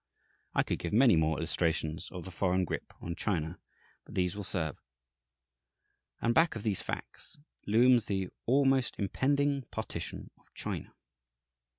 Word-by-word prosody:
I - - +4
could - - -2
give 85 - -4
many 120 -2 +6
more 80 -1 +2
illustrations 80 +2 0
of 90 -2 -7
the 95 - -7
foreign 90 0 +1
grip - - -4
on 85 - -4
China, 85 -4 -2 0.4
but - - -12
these 90 0 +1
will 105 - -4
serve. 80 -6 -2 1.4
And 115 - +2
back 160 +3 +4
of 110 - -5
these 105 -4 0
facts - - -6 0.3
looms 120 +3 +5
the 95 -2 -1 0.2
always 135 0 +4
impending 140 +7 +1
"partition 110 - -5
of - - -25
China." - - -5
100 Hz, 145 wpm, -31 LUFS, 85-125 Hz, 1.4 s, many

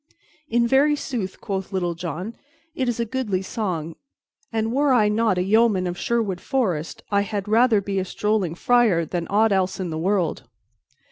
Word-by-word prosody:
"In 235 0 +2
very 280 +4 +4
sooth," 225 -9 -4
quoth 190 -3 -4
Little 180 -3 -1
John, 180 +6 -5 0.4
"it 260 -5 -1
is 240 - -2
a 235 - +1
goodly 215 -6 -2
song, 180 -7 -3 0.6
and, 225 0 -1
were 285 +1 +2
I 215 -4 +4
not 215 -2 +1
a 180 - +1
yeoman 210 -1 +3
of 175 -1 -2
Sherwood 205 -3 -1
Forest, 185 - -2
I 200 0 +3
had 205 0 -3
rather 225 0 +4
be 195 0 -2
a - - 0
strolling 205 -4 -1
friar 220 -6 +3
than 170 0 -3
aught 215 +2 +3
else 190 -1 0
in 180 -3 -3
the 155 - -3
world." 175 - 0
205 Hz, 180 wpm, -23 LUFS, 180-230 Hz, 0.6 s, very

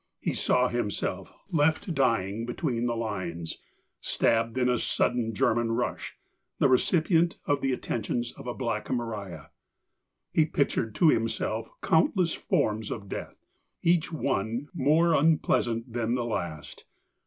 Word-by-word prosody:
He - - -1
saw 125 0 +2
himself 120 -4 -3 0.2
left 160 +3 +2
dying 115 -5 +1
between 120 -2 -1
the 120 - -1
lines, 90 -7 -4 0.4
stabbed 115 +1 +1
in 125 -1 +2
a 125 -1 +2
sudden 115 -3 0
German 115 +2 +2
rush, - - -3 0.4
the - - +4
re 130 -1 +5
cipient 170 0 +2
of 145 -1 +1
the 135 - +1
attentions 120 -1 -2
of - - -11
a 120 - -2
Black 115 -4 -3
Maria. 100 -10 -4 0.8
He 155 - +4
pictured 140 -7 0
to 165 - +5
himself 115 -5 0
countless 185 - +3
forms 110 0 0
of 100 -3 -6
death, - - -7 0.4
each 170 -1 +2
one 125 -3 -2
more 165 +2 +3
unpleasant 125 -7 +2
than 120 0 0
the 120 -1 -1
last. 85 -9 -5
120 Hz, 135 wpm, -28 LUFS, 110-145 Hz, 0.8 s, re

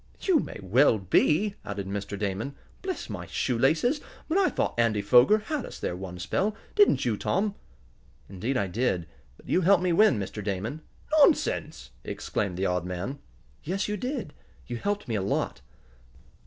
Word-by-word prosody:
"You 365 -5 +3
may - - -5
well 115 +5 +4
be," 155 - +2
added 100 -1 -4
Mr. 100 +1 -4
Damon. 105 +7 -3 0.3
"Bless 375 -1 -4
my - - -6
shoelaces, 155 - +1 0.3
but 320 - -1
I 390 -1 +4
thought - - -1
Andy 115 -3 +2
Foger 125 - +6
had 275 +6 -3
us - - -8
there 90 - -3
one 90 -1 -7
spell; 195 - -1 0.2
didn't 410 -1 +4
you, 115 -3 +1
Tom?" 195 - 0 0.7
"Indeed 110 +8 -2
I 100 - +1
did. 95 -3 -1 0.3
But - - -19
you 185 - +2
helped 190 +1 +4
me 180 -2 +2
win, 210 - +5
Mr. 105 +1 -5
Damon." 105 +9 -3 0.4
"Nonsense!" 65 - +2
exclaimed 95 -3 -3
the 95 - 0
odd 90 -2 0
man. 90 +10 -4 0.4
"Yes, 190 +5 -1
you 210 - -1
did. 250 - -4 0.3
You 120 - -4
helped 205 - -2
me 115 - -2
a 105 - 0
lot." 95 - -1
120 Hz, 170 wpm, -27 LUFS, -, 0.7 s, Foger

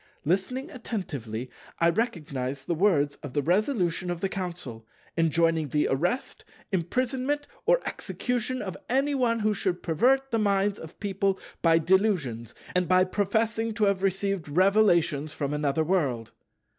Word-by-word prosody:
Listening 225 - -1
attentively, 140 - -5 0.3
I 170 - +4
recognized 150 - -2
the 175 - 0
words 155 -6 +2
of 145 -4 -7
the 145 - 0
Resolution 180 - +1
of 175 -1 -2
the 195 - -1
Council, 170 -13 -6 0.3
enjoining 165 -1 +2
the 150 +2 +1
arrest, 175 - -1 0.3
imprisonment, 255 - -1 0.2
or - - +5
execution 250 0 -3
of 190 -4 -5
any 275 +4 +2
one 235 -4 +1
who 215 0 +2
should 185 -3 -2
pervert 265 - +2
the 230 - +1
minds 200 -1 +1
of 160 0 -11
people 195 -1 0 0.2
by 165 -1 +5
delusions, 165 - +1 0.2
and 180 -1 +1
by 185 0 +5
professing 220 +3 0
to 215 - 0
have 200 -2 +2
received 195 -3 -1
revelations 170 -4 +3
from 145 -1 -2
another 150 +1 +1
World. 135 - 0
185 Hz, 145 wpm, -27 LUFS, 155-215 Hz, 0.3 s, or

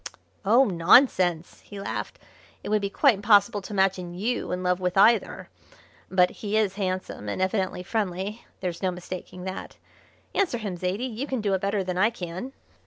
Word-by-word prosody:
"Oh, 235 +7 +5
nonsense!" 175 - +3
he 205 - -11
laughed. 195 - -5 0.5
"It - - -5
would 210 0 +2
be 200 - -2
quite 275 +5 +4
impossible 205 +1 +3
to 195 - -10
imagine 190 -3 0
you 225 +7 -2
in 180 0 -2
love 180 0 +1
with 180 0 -1
either. 225 +4 +3 0.6
But 180 -1 +3
he 210 0 -1
is 210 -3 +2
handsome, 185 - -4
and - - -3
evidently 185 -1 -1
friendly 200 +1 -3 0.2
there's 175 -2 -4
no 190 - +1
mistaking 180 0 -7
that. 190 0 -6 0.6
Answer 375 -11 +1
him, 205 -5 -4
Zaidie; 185 +7 -2
you 255 +3 -4
can 260 -3 -2
do 205 -2 0
it 190 - 0
better 200 0 0
than 180 -1 -3
I 215 +4 +5
can." 185 +2 -6
195 Hz, 175 wpm, -26 LUFS, 180-215 Hz, 0.6 s, Oh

